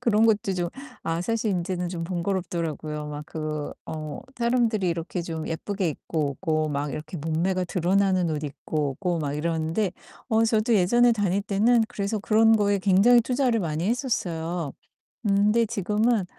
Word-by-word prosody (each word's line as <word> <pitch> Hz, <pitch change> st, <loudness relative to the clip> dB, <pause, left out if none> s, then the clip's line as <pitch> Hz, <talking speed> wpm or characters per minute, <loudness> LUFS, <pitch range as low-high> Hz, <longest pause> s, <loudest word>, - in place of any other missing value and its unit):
그런 225 Hz, -2 st, +3 dB
것도 205 Hz, -3 st, +2 dB
좀 175 Hz, -1 st, -1 dB, 0.4 s
아 165 Hz, +1 st, -1 dB
사실 225 Hz, +2 st, 0 dB
인제는 180 Hz, 0 st, -2 dB
좀 170 Hz, -2 st, -4 dB
번거롭더라고요. 170 Hz, -4 st, -3 dB
막 150 Hz, 0 st, -6 dB
그 155 Hz, -2 st, -4 dB
어 155 Hz, -2 st, -5 dB, 0.2 s
사람들이 235 Hz, -5 st, +1 dB
이렇게 170 Hz, +1 st, -3 dB
좀 160 Hz, -2 st, -5 dB
예쁘게 185 Hz, +3 st, -2 dB
입고 150 Hz, 0 st, -2 dB
오고 155 Hz, +2 st, -1 dB
막 145 Hz, 0 st, -2 dB
이렇게 155 Hz, +3 st, -6 dB
몸매가 170 Hz, +5 st, 0 dB
드러나는 185 Hz, 0 st, +2 dB
옷 150 Hz, -1 st, -2 dB
입고 145 Hz, 0 st, -2 dB
오고 180 Hz, -3 st, 0 dB
막 145 Hz, -2 st, -2 dB
이러는데 165 Hz, +5 st, -1 dB, 0.4 s
어 225 Hz, -1 st, +3 dB
저도 225 Hz, +1 st, +2 dB
예전에 240 Hz, +6 st, +4 dB
다닐 200 Hz, -3 st, +1 dB
때는 225 Hz, +4 st, +3 dB
그래서 210 Hz, -1 st, -2 dB
그런 220 Hz, +2 st, +4 dB
거에 205 Hz, -1 st, +2 dB
굉장히 200 Hz, +6 st, +5 dB
투자를 245 Hz, -1 st, +1 dB
많이 165 Hz, +2 st, -1 dB
했었어요. 175 Hz, -, -2 dB, 0.5 s
음 200 Hz, -1 st, +3 dB
근데 230 Hz, +2 st, +4 dB
지금은 215 Hz, 0 st, +1 dB
185 Hz, 340 characters per minute, -25 LUFS, 160-215 Hz, 0.5 s, 굉장히